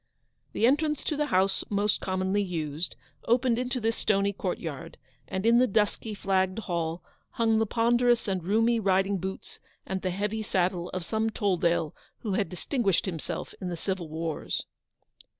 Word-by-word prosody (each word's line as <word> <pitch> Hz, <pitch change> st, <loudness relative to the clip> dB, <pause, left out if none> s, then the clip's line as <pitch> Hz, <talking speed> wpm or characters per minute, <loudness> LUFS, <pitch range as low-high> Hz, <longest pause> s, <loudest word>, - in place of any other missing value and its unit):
The 225 Hz, -, +2 dB
entrance 300 Hz, +3 st, +2 dB
to 305 Hz, -, -1 dB
the 295 Hz, 0 st, 0 dB
house 190 Hz, -4 st, +2 dB
most 205 Hz, 0 st, +1 dB
commonly 190 Hz, +2 st, 0 dB
used, 165 Hz, -3 st, -3 dB, 0.3 s
opened 240 Hz, 0 st, +3 dB
into 250 Hz, 0 st, -1 dB
this 225 Hz, 0 st, 0 dB
stony 200 Hz, -1 st, +1 dB
courtyard; 170 Hz, -7 st, -4 dB, 0.3 s
and 190 Hz, +2 st, -3 dB
in 235 Hz, +1 st, +6 dB
the 255 Hz, -, +5 dB
dusky, 210 Hz, +1 st, 0 dB
flagged 190 Hz, -1 st, +1 dB
hall, 170 Hz, -5 st, -2 dB, 0.3 s
hung 225 Hz, -1 st, +3 dB
the 225 Hz, -, +1 dB
ponderous 240 Hz, +1 st, +3 dB
and 190 Hz, -3 st, -1 dB
roomy 225 Hz, +5 st, +3 dB
riding 195 Hz, -1 st, +2 dB
boots 190 Hz, +2 st, -6 dB, 0.3 s
and 190 Hz, 0 st, -3 dB
the 185 Hz, -, -1 dB
heavy 205 Hz, +4 st, -2 dB
saddle 180 Hz, -3 st, 0 dB
of 185 Hz, -2 st, -4 dB
some 220 Hz, +4 st, 0 dB
Tolldale 175 Hz, -7 st, +1 dB, 0.3 s
who 210 Hz, -4 st, -2 dB
had 195 Hz, -3 st, 0 dB
distinguished 195 Hz, -, 0 dB
himself 170 Hz, -5 st, -4 dB
in 185 Hz, -, -3 dB
the 175 Hz, -, -4 dB
civil 185 Hz, -2 st, -3 dB
wars. 160 Hz, 0 st, -3 dB
195 Hz, 160 wpm, -28 LUFS, 180-225 Hz, 0.3 s, in